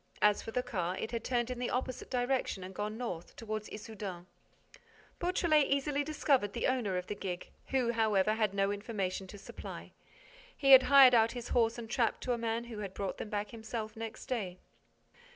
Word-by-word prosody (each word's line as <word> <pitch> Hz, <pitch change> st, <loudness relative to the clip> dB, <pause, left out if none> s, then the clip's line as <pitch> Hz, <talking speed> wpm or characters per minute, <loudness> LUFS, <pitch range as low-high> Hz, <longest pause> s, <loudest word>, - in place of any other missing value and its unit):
As 210 Hz, -1 st, +5 dB
for -, -, -8 dB
the 250 Hz, +2 st, -1 dB
car, 180 Hz, -5 st, -2 dB
it 220 Hz, -, -4 dB
had 230 Hz, -2 st, -3 dB
turned 240 Hz, -1 st, 0 dB
in 250 Hz, -, -4 dB
the 250 Hz, -, -1 dB
opposite 255 Hz, 0 st, -3 dB
direction 250 Hz, -6 st, 0 dB
and 185 Hz, +1 st, -8 dB
gone 210 Hz, +3 st, -3 dB
north, 180 Hz, -9 st, -5 dB
toward 215 Hz, -1 st, -4 dB
Issoudun. 205 Hz, -5 st, -7 dB, 0.9 s
Beautrelet 340 Hz, -4 st, +3 dB
easily 280 Hz, +1 st, +1 dB
discovered 280 Hz, -8 st, +1 dB
the -, -, -1 dB
owner 240 Hz, -8 st, +1 dB
of 180 Hz, -, -3 dB
the -, -, -4 dB
gig, 180 Hz, -3 st, -5 dB, 0.2 s
who, 255 Hz, -3 st, +1 dB
however, 215 Hz, -3 st, +2 dB
had 215 Hz, -2 st, +1 dB
no 195 Hz, 0 st, +2 dB
information 200 Hz, -3 st, -3 dB
to 205 Hz, -, -10 dB
supply. -, -, -9 dB, 0.7 s
He 275 Hz, -1 st, +3 dB
had 265 Hz, -1 st, +12 dB
hired 275 Hz, -3 st, +9 dB
out 225 Hz, -1 st, +5 dB
his 245 Hz, -1 st, -6 dB
horse 230 Hz, -1 st, +2 dB
and 235 Hz, -1 st, -6 dB
trap 230 Hz, 0 st, +1 dB
to 250 Hz, -, 0 dB
a -, -, -1 dB
man 230 Hz, 0 st, -1 dB
who 215 Hz, -4 st, -5 dB
brought 195 Hz, +1 st, -4 dB
them -, -, -5 dB
back 205 Hz, -1 st, -3 dB
himself 220 Hz, -1 st, -5 dB
next 225 Hz, 0 st, -7 dB
day. 200 Hz, -8 st, -3 dB
225 Hz, 190 wpm, -32 LUFS, 205-250 Hz, 0.9 s, had